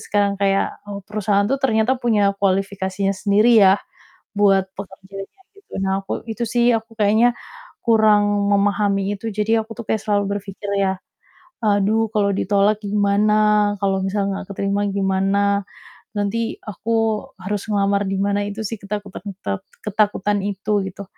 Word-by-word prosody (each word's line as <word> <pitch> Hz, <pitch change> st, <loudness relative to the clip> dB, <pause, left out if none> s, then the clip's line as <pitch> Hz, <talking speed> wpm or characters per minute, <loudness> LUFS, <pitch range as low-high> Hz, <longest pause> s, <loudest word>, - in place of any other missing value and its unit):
sekarang 205 Hz, -1 st, 0 dB
kayak, 195 Hz, 0 st, +1 dB
eee, 200 Hz, 0 st, -5 dB
perusahaan 205 Hz, -1 st, 0 dB
tuh 275 Hz, -, +1 dB
ternyata 225 Hz, -1 st, +2 dB
punya 210 Hz, -5 st, +2 dB
kualifikasinya 195 Hz, 0 st, 0 dB
sendiri 210 Hz, +4 st, +4 dB
ya, 195 Hz, 0 st, +6 dB, 0.6 s
buat 195 Hz, -2 st, +4 dB
pekerjanya, 195 Hz, -, -10 dB, 0.2 s
gitu. 400 Hz, -, -22 dB
Nah 190 Hz, 0 st, 0 dB
aku 195 Hz, -, -4 dB
itu 235 Hz, +2 st, -2 dB
sih 240 Hz, 0 st, +3 dB
aku 225 Hz, +1 st, -7 dB
kayaknya 220 Hz, +4 st, +4 dB, 0.5 s
kurang 205 Hz, -3 st, +3 dB
memahami 200 Hz, 0 st, +1 dB
itu 225 Hz, +3 st, -6 dB
jadi 220 Hz, +2 st, +1 dB
aku 225 Hz, -, -10 dB
tuh 230 Hz, -, -5 dB
kayak 220 Hz, -, 0 dB
selalu 205 Hz, -1 st, +1 dB
berpikir 200 Hz, +1 st, -8 dB
ya, 190 Hz, -1 st, +1 dB, 0.7 s
"Aduh, 210 Hz, +2 st, +2 dB
kalau 200 Hz, -1 st, +2 dB
ditolak 205 Hz, +2 st, +2 dB
gimana? 210 Hz, +1 st, +3 dB
Kalau 195 Hz, -1 st, +1 dB
misalnya 195 Hz, 0 st, -1 dB
nggak -, -, -17 dB
keterima 200 Hz, +1 st, 0 dB
gimana? 200 Hz, +1 st, +1 dB, 0.5 s
Nanti 220 Hz, +3 st, -1 dB
aku 220 Hz, +2 st, -5 dB, 0.5 s
harus 205 Hz, +1 st, -2 dB
ngelamar 200 Hz, 0 st, +1 dB
di 195 Hz, -, -1 dB
mana?" 200 Hz, 0 st, +1 dB
Itu 205 Hz, +2 st, -6 dB
sih, 225 Hz, +2 st, -5 dB
ketak 205 Hz, +1 st, -4 dB
ketak 200 Hz, -, -10 dB, 0.2 s
keten 100 Hz, -1 st, -2 dB, 0.3 s
ketakutan 210 Hz, -1 st, +1 dB
itu, 200 Hz, +1 st, -3 dB, 0.2 s
gitu. 195 Hz, +2 st, -8 dB
205 Hz, 145 wpm, -21 LUFS, 195-215 Hz, 0.7 s, ya